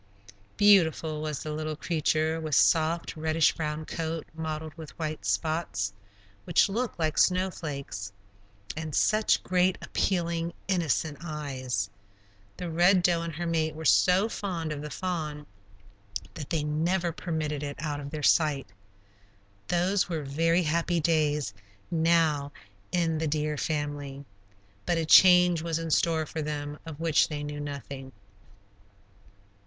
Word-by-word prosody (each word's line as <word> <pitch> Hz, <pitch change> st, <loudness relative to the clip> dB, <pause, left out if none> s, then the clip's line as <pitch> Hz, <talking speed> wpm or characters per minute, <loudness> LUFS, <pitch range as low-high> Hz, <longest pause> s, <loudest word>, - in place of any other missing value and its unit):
Beautiful 165 Hz, -6 st, +4 dB
was 155 Hz, -2 st, -3 dB
the 155 Hz, -, -4 dB
little 155 Hz, 0 st, -3 dB
creature, 155 Hz, 0 st, 0 dB
with 155 Hz, -3 st, -1 dB
soft, 165 Hz, +2 st, +3 dB
reddish 160 Hz, 0 st, +2 dB
brown 155 Hz, -1 st, -3 dB
coat 165 Hz, 0 st, -4 dB
mottled 160 Hz, -1 st, -4 dB
with 160 Hz, -2 st, -11 dB
white 155 Hz, -8 st, -4 dB
spots, 100 Hz, -2 st, -1 dB, 0.5 s
which -, -, +4 dB
looked 235 Hz, +4 st, -2 dB
like 155 Hz, -2 st, 0 dB
snowflakes, 150 Hz, -, -1 dB, 0.6 s
and 155 Hz, -1 st, -4 dB
such 215 Hz, 0 st, +3 dB
great, 185 Hz, 0 st, +2 dB
appealing, 170 Hz, -2 st, -1 dB
innocent 160 Hz, -5 st, 0 dB
eyes. 130 Hz, -9 st, -3 dB, 0.7 s
The 180 Hz, -, -4 dB
Red 175 Hz, +3 st, +4 dB
Doe 170 Hz, -2 st, +3 dB
and 165 Hz, -2 st, -5 dB
her 175 Hz, +2 st, -3 dB
mate 160 Hz, -2 st, 0 dB
were 160 Hz, +1 st, -7 dB
so 185 Hz, +7 st, +5 dB
fond 175 Hz, -8 st, -4 dB
of 145 Hz, -1 st, -4 dB
the 150 Hz, -, -6 dB
fawn 155 Hz, -5 st, -4 dB, 0.9 s
that 145 Hz, -, -7 dB
they 160 Hz, -3 st, 0 dB
never 170 Hz, +4 st, 0 dB
permitted 155 Hz, -3 st, -3 dB
it 145 Hz, -1 st, -4 dB
out 150 Hz, -2 st, -3 dB
of 140 Hz, -1 st, -6 dB
their 150 Hz, 0 st, -6 dB
sight. 145 Hz, -, +2 dB, 1.0 s
Those 180 Hz, +3 st, +1 dB
were 160 Hz, -3 st, -2 dB
very 165 Hz, +5 st, +2 dB
happy 170 Hz, +2 st, +1 dB
days 150 Hz, -7 st, +1 dB, 0.4 s
now 160 Hz, -4 st, +2 dB, 0.4 s
in 165 Hz, -3 st, +1 dB
the 160 Hz, -, 0 dB
deer 150 Hz, 0 st, -1 dB
family. 145 Hz, -1 st, -3 dB, 0.6 s
But 175 Hz, -, +2 dB
a 165 Hz, -, 0 dB
change 180 Hz, 0 st, +7 dB
was 165 Hz, -1 st, -1 dB
in 165 Hz, -1 st, -4 dB
store 160 Hz, -1 st, +2 dB
for 160 Hz, -, -5 dB
them 150 Hz, 0 st, -4 dB
of 155 Hz, -2 st, -7 dB
which 165 Hz, -2 st, +3 dB
they 145 Hz, -2 st, -4 dB
knew 145 Hz, 0 st, -5 dB
nothing. 140 Hz, -2 st, -7 dB
160 Hz, 140 wpm, -28 LUFS, 150-170 Hz, 1.0 s, change